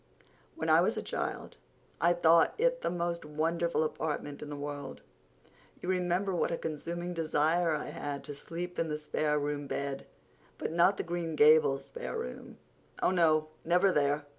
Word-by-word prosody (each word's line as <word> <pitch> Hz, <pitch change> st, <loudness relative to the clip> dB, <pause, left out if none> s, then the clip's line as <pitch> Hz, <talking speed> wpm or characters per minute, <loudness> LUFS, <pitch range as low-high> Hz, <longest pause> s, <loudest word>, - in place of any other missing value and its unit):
When -, -, -3 dB
I -, -, +6 dB
was -, -, +1 dB
a -, -, -3 dB
child -, -, -4 dB, 0.4 s
I 170 Hz, +2 st, +5 dB
thought 165 Hz, -1 st, +4 dB
it -, -, +2 dB
the -, -, 0 dB
most 170 Hz, -1 st, -2 dB
wonderful 160 Hz, +2 st, 0 dB
apartment 150 Hz, -2 st, -3 dB
in 150 Hz, -, -7 dB
the 145 Hz, -, -5 dB
world. 145 Hz, 0 st, -6 dB, 0.8 s
You 180 Hz, -, -5 dB
remember 185 Hz, +1 st, 0 dB
what 175 Hz, -, +1 dB
a 170 Hz, -, -1 dB
consuming 170 Hz, +3 st, -4 dB
desire 160 Hz, +1 st, +1 dB
I 150 Hz, -, -4 dB
had 145 Hz, -1 st, -5 dB
to 145 Hz, -, -6 dB
sleep 175 Hz, +5 st, -6 dB
in 165 Hz, -, 0 dB
a 150 Hz, -, -1 dB
spare 150 Hz, 0 st, 0 dB
room 145 Hz, -1 st, -2 dB
bed—but 140 Hz, +2 st, -6 dB
not 175 Hz, +4 st, +4 dB
the -, -, -2 dB
Green 170 Hz, -2 st, -3 dB
Gables 150 Hz, -2 st, +5 dB
spare -, -, -6 dB
room. 65 Hz, -, -7 dB, 0.5 s
Oh, -, -, +4 dB
no, 155 Hz, -4 st, +3 dB
never 180 Hz, +3 st, +4 dB
there! 145 Hz, -1 st, +1 dB
160 Hz, 165 wpm, -31 LUFS, 150-175 Hz, 0.8 s, I